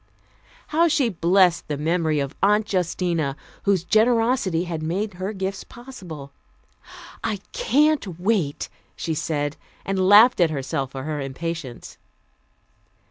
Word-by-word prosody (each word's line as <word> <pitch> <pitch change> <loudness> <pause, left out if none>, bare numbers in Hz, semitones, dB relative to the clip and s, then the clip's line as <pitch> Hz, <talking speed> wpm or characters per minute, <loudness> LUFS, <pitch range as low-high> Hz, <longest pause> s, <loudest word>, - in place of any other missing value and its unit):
How 330 +3 +3
she 285 -6 +2
blessed 180 -1 +3
the 150 - -3
memory 160 0 0
of 140 +1 -3
Aunt 210 +2 +3
Justina, 170 -5 0 0.3
whose 195 -4 +2
generosity 225 -4 +2
had 170 -3 -4
made 185 +7 -2
her 185 +3 -4
gifts 195 -1 -4
possible! 180 - -10 0.9
"I 215 - -1
can't 300 - +1
wait," 180 -7 0 0.3
she 165 - -3
said, 145 -1 -2 0.3
and 190 -1 +1
laughed 220 +4 +7
at 170 - +5
herself 140 -1 -3
for 135 -1 -5
her 150 0 -3
impatience. 140 -1 -6
180 Hz, 125 wpm, -23 LUFS, 155-210 Hz, 0.9 s, laughed